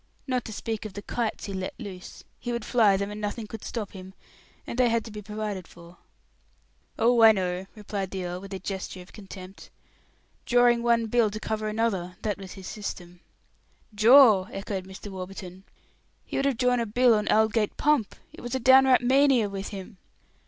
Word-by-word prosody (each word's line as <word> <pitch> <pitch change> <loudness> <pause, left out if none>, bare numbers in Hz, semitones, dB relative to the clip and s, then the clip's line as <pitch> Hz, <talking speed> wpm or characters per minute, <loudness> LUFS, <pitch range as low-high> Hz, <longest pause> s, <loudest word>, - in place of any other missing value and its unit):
Not 255 -3 -1
to - - -7
speak 220 0 -4
of 215 -3 -7
the 205 - -7
kites 230 -1 -3
he 200 - -6
let 185 -1 -4
loose; 190 -6 -9 0.2
he 240 - -4
would 235 -2 -3
fly 215 -6 +4
them, 200 +1 -3
and 210 +1 -7
nothing 210 +2 -3
could 220 0 -9
stop 220 -4 -5
him; 190 0 -11 0.5
and 240 - -5
they 250 -1 +4
had 230 -1 0
to 225 - -9
be 210 0 -7
provided 210 -3 -5
for." 170 0 -15 1.0
"Oh, 235 +1 +3
I 225 0 +9
know," 185 -2 -2
replied 200 -2 -4
the 190 -1 -4
earl, 180 +1 -5
with 195 0 -10
a 195 - -3
gesture 190 -1 -6
of 180 - -20
contempt. 195 -2 -11 0.8
"Drawing 245 -1 +4
one 235 -1 +2
bill 225 0 +2
to 215 +1 -6
cover 215 0 -3
another; 210 -5 -1
that 210 -2 -2
was 190 -2 -9
his 190 -1 -11
system." 180 -4 -7 0.7
"Draw!" 220 -2 +7
echoed 195 -1 -5
Mr. 190 +2 -9
Warburton. 185 0 -8 0.6
"He - - -7
would 275 - 0
have 275 -4 +1
drawn 250 0 +2
a 230 - -1
bill 245 +3 +4
on 210 -1 0
Aldgate 220 0 +2
pump. 295 -8 +1 0.2
It - - -11
was 245 +2 -4
a - - 0
downright 260 +1 +6
mania 260 -3 +3
with 195 0 -5
him." 195 +1 -9
210 Hz, 195 wpm, -26 LUFS, 190-235 Hz, 1.0 s, I